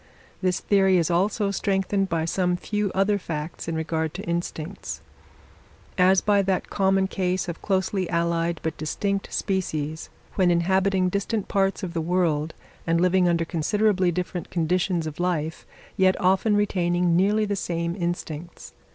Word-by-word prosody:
This 185 -1 +1
theory 195 -2 +3
is 170 0 +1
also 200 +3 +1
strengthened 195 0 0
by 165 -1 0
some 180 +1 0
few 210 +1 -2
other 200 +2 +2
facts 160 -2 -5
in 165 - -2
regard 160 -1 -2
to - - -5
instincts; 170 +1 -4 1.0
as 185 0 +4
by 205 -1 +3
that 190 -1 -1
common 195 -1 +2
case 185 0 -1
of 170 -1 -6
closely 190 -1 0
allied, 170 -1 0
but 160 -1 -2
distinct, 195 +6 -2
species, 160 -6 -2 0.2
when 185 -2 +3
inhabiting 185 +2 +2
distant 200 +2 -2
parts 195 0 0
of 175 -2 -4
the 165 - -1
world 165 -2 0 0.3
and 165 0 +2
living 180 0 +3
under 170 -1 +1
considerably 185 +3 +1
different 180 0 -4
conditions 175 0 0
of 155 0 -6
life, 165 -3 -2 0.3
yet 190 0 +3
often 195 +3 +3
retaining 175 -4 +1
nearly 205 +4 +3
the 205 -1 -1
same 170 -2 -2
instincts. 170 -2 -5
180 Hz, 150 wpm, -25 LUFS, 170-195 Hz, 1.0 s, as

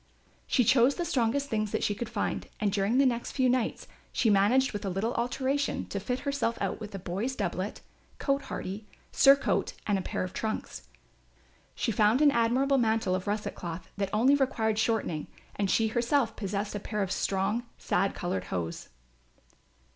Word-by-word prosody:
She 250 - +3
chose 250 +4 +4
the 345 - -2
strongest 265 0 +1
things 215 -4 -1
that - - -2
she 205 - +1
could 220 +2 -5
find - - -2
and 210 -2 +1
during 200 +4 +1
the 275 - +5
next 240 -2 0
few 260 -2 +2
nights 250 -2 0 0.2
she 225 - +2
managed 220 +7 +3
with 205 - -4
a 195 - -1
little 200 +6 -1
alteration 265 +4 -1
to 200 - -3
fit 250 +6 -3
herself 275 -5 -1
out - - -2
with 210 -2 -7
a - - -2
boy's 195 +8 -3
doublet, - - -3 0.4
cote 275 0 0
hardie, 205 +3 -5 0.2
surcoat 275 +1 +4
and 205 -2 +1
a - - -2
pair - - -3
of 185 - -5
trunks. 220 -1 -4 0.9
She 230 - 0
found 215 +3 +3
an 295 -1 +6
admirable 260 +3 +2
mantle 220 -5 +1
of 185 +1 -2
russet 210 +1 -2
cloth 170 0 -7
that 195 -1 -1
only 240 +6 +4
required 230 -6 +1
shortening 215 -10 0 0.3
and 200 -1 0
she 220 +3 +3
herself 235 0 +1
possessed 200 0 -3
a 205 - -3
pair 210 +1 -2
of 190 - -4
strong 195 +4 0 0.2
sad 195 - 0
coloured 135 - -2
hose. 85 -2 -4
220 Hz, 180 wpm, -29 LUFS, 200-255 Hz, 0.9 s, an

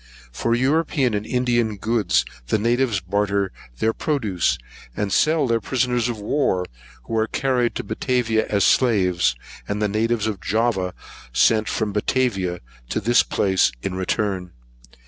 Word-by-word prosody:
For 115 - 0
European 135 -1 +1
and 105 +1 -2
India 125 -1 +2
goods 110 -2 0 0.2
the - - +2
natives 115 -1 +1
barter 100 +1 0 0.3
their 110 - +1
produce, 110 - 0 0.4
and 100 -2 -1
sell 155 - +3
their 115 -2 +1
prisoners 125 +1 0
of 120 - -3
war, 100 -5 0 0.4
who 115 - -5
are 110 - +1
carried 125 -3 0
to - - -3
Batavia 120 -4 0
as 100 -1 +1
slaves, 90 - +3 0.3
and 105 0 -2
the 105 - +1
natives 110 +2 0
of 105 -4 -3
Java 105 -5 0 0.4
sent 110 - +3
from 105 -2 -1
Batavia 100 -5 0 0.3
to - - -1
this 120 +3 +4
place 95 -8 +2
in 95 - -2
return. 95 -1 -2
110 Hz, 145 wpm, -22 LUFS, 100-120 Hz, 0.4 s, this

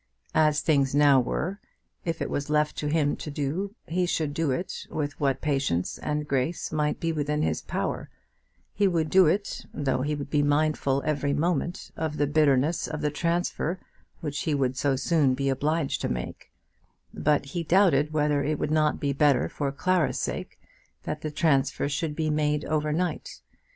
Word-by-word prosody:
As 150 -1 +3
things 140 -4 +2
now 145 -2 +6
were, 175 - -2 0.5
if 165 -1 -1
it - - -4
was 145 +1 -2
left 150 0 +2
to 150 - -2
him 145 -1 +1
to - - -6
do, 155 +9 -3
he 180 +2 0
should 155 -4 -1
do 160 0 0
it, 170 +8 -3
with 145 -1 -3
what 135 -3 +1
patience 135 - -1
and 150 0 -2
grace 140 +5 -1
might 150 -1 0
be 165 - 0
within 150 -1 -1
his - - 0
power; - - -3 0.6
he 205 - +3
would 165 -4 0
do 185 -3 +6
it, 200 +6 -1
though 135 -3 -1
he 150 +3 -1
would 140 -1 -6
be 145 - +3
mindful 145 -2 +1
every 145 -2 0
moment 170 +3 -1
of 155 -1 -3
the 145 - +2
bitterness 145 +1 +2
of 155 -1 -4
the 150 -1 0
transfer 170 +2 -1 0.4
which 150 -2 -3
he 155 -2 0
would 130 -2 0
so 135 +1 +1
soon 140 -1 +2
be 135 +1 0
obliged 150 +3 0
to - - -1
make; - - -5 0.6
but 150 -1 +1
he 175 - -1
doubted 165 -4 +3
whether 150 -2 +1
it 150 +2 0
would 150 - -2
not 155 -1 +2
be 140 -1 0
better 140 -3 +3
for 140 -2 -3
Clara's 170 +3 +1
sake - - -4 0.4
that 150 - -4
the 155 - -3
transfer 145 -3 +1
should 150 +1 -2
be 155 -1 0
made 150 -1 0
over 155 -1 0
night. 175 +3 -3
150 Hz, 180 wpm, -27 LUFS, 140-160 Hz, 0.6 s, now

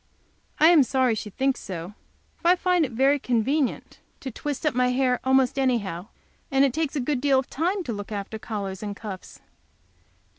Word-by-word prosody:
I 315 +2 +7
am 340 -4 +7
sorry 260 -2 +2
she 215 -1 -5
thinks 265 +6 0
so, 180 0 -7 0.4
for - - -3
I 355 - +7
find 360 -2 +2
it 255 - -7
very 270 +5 +3
convenient 255 +3 -1 0.2
to 265 - -5
twist 290 +5 -5
up 300 - +2
my 250 +1 +2
hair 250 0 +1
almost 265 0 +2
any 260 -2 +3
how, 190 -3 -6 0.4
and 270 -2 +4
it 265 - 0
takes 315 -1 -2
a - - 0
good 260 0 -1
deal 275 -1 +3
of 260 - -2
time 360 +6 -1
to 245 -7 -4
look 205 +1 -7
after 205 +1 -5
collars 200 -4 -5
and 205 -1 -5
cuffs. 200 -3 -9
260 Hz, 195 wpm, -25 LUFS, 215-285 Hz, 0.4 s, I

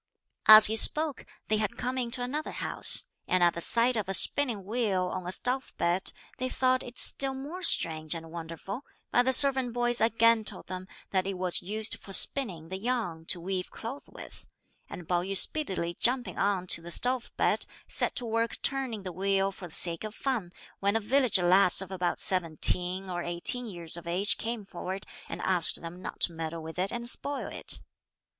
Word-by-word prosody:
As 215 0 +10
he 220 - +1
spoke, 300 +4 +4 0.2
they 215 - 0
had 210 -2 -3
come 250 +1 -4
into 245 0 -1
another 295 +5 -5
house; - - +3 0.2
and 185 -1 +1
at 175 - +3
the 170 - -5
sight 235 +6 +2
of 210 -4 -3
a 195 - +7
spinning 230 0 +2
wheel 210 -4 -2
on 185 -1 -6
a - - -4
stove 250 +7 -1
bed, 175 +2 0 0.3
they 255 0 -3
thought 255 0 0
it 245 0 -10
still 270 -1 0
more 295 +8 -8
strange 160 - +1
and 165 -1 -9
wonderful, 170 +7 -8 0.3
but 245 - +2
the 260 - +2
servant 265 -2 +6
boys 240 0 +1
again 230 0 +3
told - - -8
them 185 0 -8 0.2
that 190 -1 -1
it 195 - -4
was 180 -1 +2
used 215 +4 0
for 195 - -8
spinning 185 - +4
the 190 +1 -6
yarn 195 -9 -4
to 180 - +1
weave 185 +1 -5
cloth 245 +5 -9
with, - - -13 0.4
and 175 - -10
Pao 175 -1 0
yü 195 +2 0
speedily 190 - +1
jumping 250 0 -1
on 195 -2 -1
to 175 - -1
the 170 - -10
stove 245 +7 +1
bed, - - +1 0.2
set - - -2
to 245 - -2
work 230 0 -2
turning 260 -7 -3
the 185 -2 -7
wheel 195 +2 -1
for 190 -2 -11
the 160 - -5
sake 170 0 +2
of 215 0 -8
fun, 235 -10 -4 0.3
when 200 +2 -1
a - - +2
village 250 +1 +2
lass 180 +1 +4
of 195 0 -1
about 180 -2 -3
seventeen 180 +1 +1
or 175 -1 -5
eighteen 175 +9 +2
years 170 -5 -3
of 170 -1 -7
age 185 +5 +1
came 225 -2 -5
forward, 190 0 -7 0.2
and - - -6
asked 180 -4 +3
them 170 +2 -10
not - - -9
to 170 - +4
meddle 165 0 -7
with 160 +2 -9
it 190 +2 -2
and 235 0 -6
spoil 280 +3 -4
it. - - -3
195 Hz, 200 wpm, -27 LUFS, 180-245 Hz, 0.4 s, As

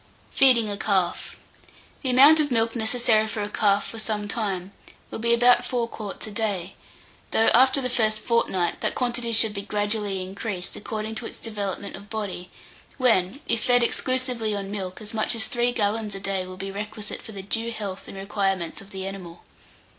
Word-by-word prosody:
FEEDING 250 -5 +5
A 205 -1 -3
CALF. 195 -3 0 0.7
The 265 - -1
amount 280 +5 +8
of 300 -1 +2
milk 230 -1 +1
necessary 220 -1 +2
for 215 -1 -3
a 205 - -5
calf 205 -1 +2
for 225 - -8
some 210 -1 -2
time, 200 -4 -2 0.4
will - - -5
be 235 +1 +1
about 245 +1 +5
four 245 -2 -1
quarts 210 -4 -6
a 215 - -7
day, 200 -4 -2 0.6
though, 225 - +4
after 260 +3 +5
the 255 - 0
first 215 -3 0
fortnight, 190 -7 +1
that - - 0
quantity 240 -2 -1
should 220 -1 +4
be 200 - -4
gradually 205 -1 -2
increased, 190 0 -4
according 215 +1 -4
to 225 +1 -4
its - - -10
development 205 -3 -4
of 200 +1 -12
body, 200 -5 -4 0.5
when, 230 -2 +2
if 230 -1 +1
fed 245 -1 +5
exclusively 250 -3 0
on 200 -1 -4
milk, 190 -2 -5
as 210 - -6
much 220 +2 0
as 225 - +1
three 240 -2 +1
gallons 210 -2 -1
a - - -5
day 195 -1 -2
will 185 0 -9
be 195 +1 -5
requisite 210 +1 -5
for - - -10
the 195 -1 -7
due 225 +4 -1
health 205 -4 -5
and - - -9
requirements 195 -3 -1
of 195 - -14
the 190 -1 -6
animal. 185 -3 -8
215 Hz, 190 wpm, -25 LUFS, 195-235 Hz, 0.7 s, amount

